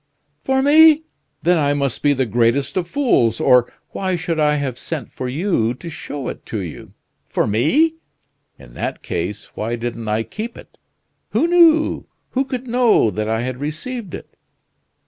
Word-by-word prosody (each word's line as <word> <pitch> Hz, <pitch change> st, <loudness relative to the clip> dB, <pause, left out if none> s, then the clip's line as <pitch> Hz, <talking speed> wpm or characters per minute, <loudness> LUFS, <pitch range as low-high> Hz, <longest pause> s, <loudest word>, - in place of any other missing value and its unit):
"For 265 Hz, 0 st, +1 dB
me! 310 Hz, +2 st, +7 dB, 0.4 s
Then 175 Hz, 0 st, +3 dB
I 145 Hz, -1 st, +2 dB
must 140 Hz, -3 st, -2 dB
be 145 Hz, -, +3 dB
the 130 Hz, -1 st, 0 dB
greatest 120 Hz, +4 st, +1 dB
of 180 Hz, -3 st, -1 dB
fools, 175 Hz, -, +2 dB
or 125 Hz, -1 st, +4 dB, 0.2 s
why 185 Hz, -1 st, -1 dB
should 165 Hz, -1 st, -2 dB
I 150 Hz, -1 st, +3 dB
have 135 Hz, -4 st, -3 dB
sent 150 Hz, -8 st, -5 dB
for 130 Hz, -, -5 dB
you 130 Hz, -, 0 dB
to 170 Hz, +6 st, -9 dB
show 145 Hz, -3 st, -6 dB
it -, -, -8 dB
you? 95 Hz, -8 st, -6 dB, 0.3 s
For -, -, +1 dB
me? 160 Hz, -, +2 dB, 0.6 s
In -, -, -15 dB
that -, -, -4 dB
case, 90 Hz, +4 st, -4 dB
why 115 Hz, +2 st, -2 dB
didn't 115 Hz, -1 st, -5 dB
I 110 Hz, +1 st, 0 dB
keep 225 Hz, -, -7 dB
it? -, -, -15 dB, 0.5 s
Who -, -, +3 dB
knew, 335 Hz, -2 st, +4 dB, 0.2 s
who 265 Hz, +1 st, 0 dB
could 255 Hz, -1 st, -5 dB
know 235 Hz, -, +3 dB
that 110 Hz, +1 st, -3 dB
I 110 Hz, +1 st, 0 dB
had 125 Hz, +1 st, -4 dB
received 175 Hz, -, -5 dB
it?" -, -, -12 dB
145 Hz, 165 wpm, -20 LUFS, -, 0.6 s, me